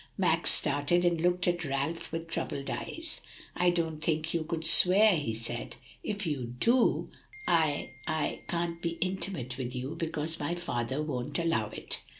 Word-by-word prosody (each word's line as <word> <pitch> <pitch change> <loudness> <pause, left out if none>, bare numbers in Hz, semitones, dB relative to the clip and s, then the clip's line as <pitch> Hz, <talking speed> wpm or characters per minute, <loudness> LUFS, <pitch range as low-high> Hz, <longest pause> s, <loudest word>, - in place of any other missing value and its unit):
Max - - +3
started, 145 +5 +2
and 170 -2 +2
looked 180 +1 +2
at 175 -1 +1
Ralph 140 +3 -2
with 165 0 -4
troubled 140 -4 -3
eyes. 330 -1 -5 0.3
"I 180 - +4
didn't 165 -3 0
think 155 0 0
you 170 - +1
would 165 -1 -2
swear," 190 +5 +7
he 145 -7 -1
said. 115 +1 -4 0.3
"If 205 -1 -2
you 130 -6 -3
do, 235 - +3 0.4
I 155 -5 +2 0.2
I 155 -2 -1
can't 170 -1 -2
be 170 -1 -2
intimate 180 -8 -2
with 125 0 -3
you, 130 +3 -3
because 160 0 -3
my 150 +4 -1
father 130 -4 -2
won't 130 -5 -3
allow 165 -11 +1
it." - - -5
165 Hz, 160 wpm, -30 LUFS, 140-175 Hz, 0.4 s, swear